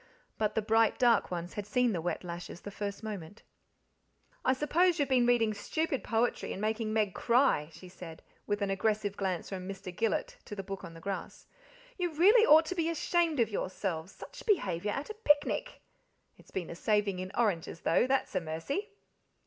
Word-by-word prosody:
But 215 -1 0
the 220 - +1
bright 225 +1 +3
dark 240 -4 +4
ones 175 0 -4
had 205 -1 -5
seen 245 +1 +2
the 170 - -2
wet 175 +2 -2
lashes 175 0 -7
the 205 - -7
first 205 +1 -5
moment. 205 -3 -7 1.0
"I 260 - +4
s'pose 335 +6 +2
you've 285 -3 +1
been 250 -2 +4
reading 230 -3 +3
stupid 275 +7 -2
poetry 230 +1 0
and - - -6
making 215 +1 -1
Meg 215 -3 +1
cry?" 235 - +2
she 185 - -12
said, 175 -2 -10 0.2
with 205 0 0
an 195 - 0
aggressive 210 0 0
glance 190 -4 -2
from 185 -1 -5
Mr. 190 -2 -7
Gillet - - -1
to 210 - -7
the 195 - -5
book 195 0 -6
on 165 - -9
the - - -10
grass. 195 +1 -5 0.5
"You 350 -2 -1
really 425 +8 +6
ought 315 +2 +8
to 370 - -3
be, 330 -2 0
ashamed 335 -2 +1
of 230 - +3
yourselves, 185 -3 -3
SICH - - -11
behaviour 200 - +1
at 275 - -3
a - - -5
picnic. 430 +5 +1 0.5
It's - - -20
been 180 -3 -4
a - - -6
saving 205 -1 +1
in 185 0 -5
oranges, 180 -7 0
though, 165 +9 +3
that's 270 0 0
a 185 - 0
mercy." 165 - -3
215 Hz, 190 wpm, -31 LUFS, 185-275 Hz, 1.0 s, ought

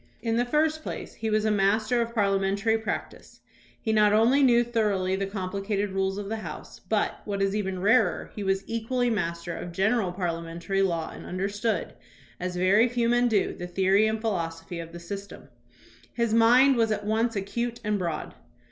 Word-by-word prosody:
In 225 -1 0
the 245 - +2
first 310 +4 +1
place, - - -6
he 220 - -3
was 215 0 +1
a 215 - +2
master 215 +4 +2
of 235 0 -4
parliamentary 200 +1 +1
practice. 220 -1 -5 0.4
He 220 - -1
not 210 -1 +5
only 235 +6 +4
knew 240 -3 +5
thoroughly 210 -6 0
the 195 0 -2
compli 195 0 -4
cated 200 -1 -1
rules 195 0 0
of 205 -1 -5
the 225 +2 -3
House, 215 - -8
but, - - -1
what 200 -1 -3
is 195 +1 +1
even 190 -3 -2
rarer, 200 -1 +2
he 210 - -4
was 195 0 0
equally 240 +2 -1
master 170 -4 -2
of 175 - -6
general 195 +1 +1
parliamentary 170 +1 -2
law 170 -4 0
and - - -10
understood, 200 +4 -2 0.5
as 180 0 -3
very 200 +7 +4
few 235 -1 0
men 240 0 +3
do, 215 -4 +1
the 175 - -7
theory 195 +4 +3
and 220 0 -2
philosophy 170 -5 -3
of 165 0 -7
the 170 - -9
system. 200 +3 -8 0.6
His 235 -2 0
mind 245 +4 +6
was 225 -1 +2
at 210 - -2
once 225 +2 0
acute 235 +4 -3
and 210 -1 0
broad. 170 -3 -3
205 Hz, 185 wpm, -26 LUFS, 190-230 Hz, 0.6 s, mind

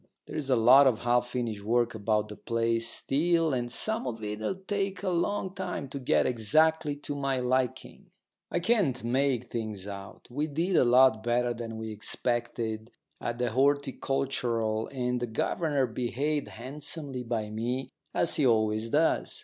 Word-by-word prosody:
There's 145 -3 -5
a 130 - +4
lot 125 +4 +7
of 120 -4 +1
half 120 0 +2
finished 120 -4 -3
work 120 +2 +1
about 105 0 0
the 105 - -7
place 115 +1 0
still 165 +4 +1
and 120 -1 -2
some 220 - 0
of 115 -2 -5
it'll 105 - -3
take 195 0 -3
a 190 - 0
long 190 +2 -1
time 185 -7 -4
to 140 - -5
get 125 - +2
exactly 150 +6 +2
to 145 0 -6
my 135 -2 -1
liking. 125 0 -2 0.4
I 175 - -1
can't 175 - +2
make 130 +1 +1
things 110 -4 -5
out. 100 -1 -9
We 145 +5 -1
did 165 +5 -1
a - - +6
lot 125 -2 +5
better 120 +1 +1
than 115 -1 -6
we 110 0 -5
expected 115 0 -3 0.3
at 120 0 -3
the 125 -2 -1
Horticultural, 130 -4 0
and 125 -2 -2
the 120 - -2
governor 140 +5 0
behaved 130 +5 -2
handsomely 140 +2 -3
by 115 -3 -3
me, 125 +4 -3 0.2
as 170 - +2
he 145 - +3
always 110 -1 +1
does. 155 +6 +1
125 Hz, 160 wpm, -29 LUFS, 115-145 Hz, 0.4 s, lot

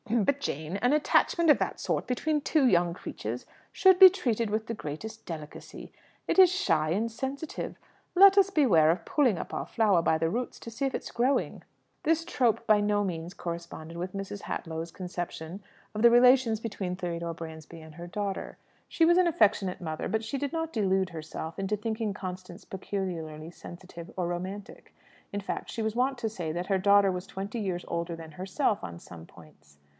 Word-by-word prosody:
"H'm, 225 - -3
h'm, - - +3
h'm! - - 0
But, 280 +4 +1
Jane, 160 - -3
an 245 +6 +2
attachment 320 +2 +3
of - - +4
that - - -2
sort - - -2
between 295 +4 0
two 295 -1 +2
young 175 -5 +3
creatures - - -6 0.3
should 375 -1 +5
be 380 -1 +12
treated 235 - -1
with 215 +1 -1
the 230 - -4
greatest 220 +6 -7
delicacy. 155 -3 -9 0.3
It - - +2
is 370 -2 +8
shy 365 - +1
and 210 +7 0
sensitive. 270 +6 -5 0.4
Let 395 +2 +8
us 390 -1 +6
beware 210 - +4
of 170 +2 0
pulling 255 - +2
up - - -6
our - - -3
flower 210 -7 +2
by 160 - +2
the 165 0 0
roots 240 +6 -3
to 230 - -8
see 275 +5 -2
if 270 - -1
it - - -4
is - - -8
growing." 255 +4 0 0.4
This 325 +1 +1
trope 235 -8 +1
by 215 -2 +4
no 205 0 +1
means 175 -2 -4
corresponded 170 -1 -6
with 180 +2 -5
Mrs. 195 0 -5
Hadlow's 165 0 -5
conception 175 0 -6 0.3
of 215 - -3
the 235 - +8
relations 245 -2 +5
between 200 -5 -4
Theodore 170 -2 -4
Bransby 160 0 -9
and 160 -1 -13
her 175 0 -8
daughter. 200 +1 -4 0.3
She 330 - +3
was 345 +2 +5
an 365 - +4
affectionate 210 - +2
mother, 155 -2 -4
but 220 0 -1
she 250 +5 -3
did 285 0 -2
not 325 -1 -3
delude 190 -3 +1
herself 160 +1 -7
into 195 +2 -1
thinking 220 0 -2
Constance 185 -1 -8
peculiarly 170 -5 -5
sensitive 175 -1 -11
or 180 -2 0
romantic. 185 +3 -6 0.4
In 205 - -3
fact, 195 - -5
she 225 - -3
was 220 0 -2
wont 260 +2 +1
to 235 -2 -2
say 175 -7 -4
that 175 +3 -4
her 195 -2 +1
daughter 200 0 +5
was 180 0 -5
twenty 200 +5 -5
years 185 -4 -3
older 170 0 -3
than 165 -1 -10
herself 190 - -1
on 85 -1 -7
some 85 -2 -12
points. 75 -3 -19
195 Hz, 200 wpm, -28 LUFS, 170-240 Hz, 0.4 s, be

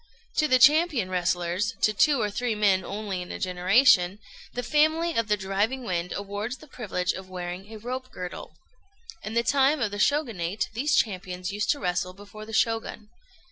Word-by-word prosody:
To 305 - +3
the 255 -3 +5
champion 290 - +4
wrestlers 180 +3 0
to 215 - +4
two 285 +6 +3
or 210 -2 0
three 240 +1 -1
men 200 -3 +3
only 200 -1 -4
in 180 - -7
a - - -5
generation 185 +1 +3 0.3
the 245 - -4
family 315 +4 +2
of 230 -2 +1
the 210 0 +2
"Driving 205 +7 -1
Wind" 180 -5 -2
awards 205 +5 -4
the - - -14
privilege 190 -10 -2
of 190 0 -9
wearing 180 +2 -6
a 220 - -7
rope 255 +4 -5
girdle. 180 -3 -7 0.7
In 215 +1 -6
the 235 - +3
time 280 +3 +3
of 215 -4 -1
the 205 - -5
Shogunate 215 - 0
these 285 +6 +1
champions 185 -2 -1
used 205 +1 -2
to 290 - +2
wrestle 180 0 -1
before 205 +2 -12
the - - -8
Shogun. 225 -1 -1
210 Hz, 180 wpm, -26 LUFS, 185-250 Hz, 0.7 s, the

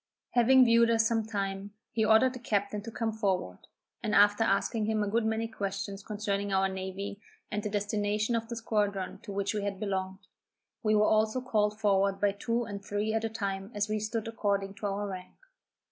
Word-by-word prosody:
Having 255 +2 +6
viewed 230 0 +5
us 225 -1 +3
some 225 -1 +1
time, 200 -1 -3 0.2
he 220 - +1
ordered 220 +4 +5
the 255 - -7
captain 205 -3 -1
to 230 - -7
come 225 0 -2
forward, 190 - -1 0.4
and 210 - 0
after 205 0 +5
asking 200 +3 +1
him 220 -1 +1
a - - -1
good 220 +2 +1
many 220 +1 0
questions 200 -2 -4
concerning 205 -1 -2
our 195 0 +3
navy, 190 +2 -5 0.3
and 210 - -1
the 210 - -3
destination 205 +2 0
of 225 0 -2
the 235 - -4
squadron 205 -4 -1
to 205 - -9
which 200 +1 -1
we 210 - -1
had 200 -1 -3
belonged, 190 -1 -3 0.6
we 215 -2 +2
were 210 0 +5
also 215 +3 +2
called 210 -4 0
forward 195 -2 +2
by 205 -1 +3
two 230 +4 -1
and 205 -3 -6
three 205 +2 -1
at 225 0 0
a 225 - 0
time 195 -3 -3
as 205 +1 0
we 215 0 0
stood 215 +1 -3
according 200 -3 -1
to 205 0 -4
our 200 +1 -2
rank. 185 -2 -8
210 Hz, 200 wpm, -30 LUFS, 200-220 Hz, 0.6 s, Having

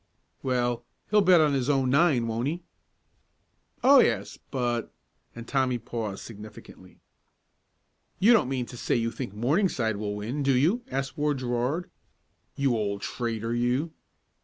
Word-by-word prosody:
"Well, 120 -2 0 0.3
he'll 210 -1 +5
bet 180 -3 +6
on 150 -2 +3
his 135 0 0
own 135 -3 +2
nine; 140 -4 +3
won't 115 +3 -2
he?" 170 +4 -3 1.2
"Oh, 275 +1 +8
yes 110 - +1
but 120 -3 -2 0.2
" - - -42
and 115 0 -9
Tommy 130 -3 +1
paused 110 -3 -5
significantly. 105 -1 -12 1.2
"You 225 +5 +6
don't 215 - +3
mean 130 -2 -1
to 120 - -10
say - - 0
you 115 -1 0
think 120 -6 -6
Morningside 120 - +1
will 105 0 -3
win, 115 +8 -4
do 135 -2 +3
you?" 175 - +2
asked 135 - -3
Ward 150 -1 +1
Gerard. 125 +7 -1 0.7
"You 135 -3 +1
old 100 -2 -2
traitor, 115 -1 -3
you!" 125 +7 0
125 Hz, 150 wpm, -27 LUFS, 115-145 Hz, 1.2 s, Oh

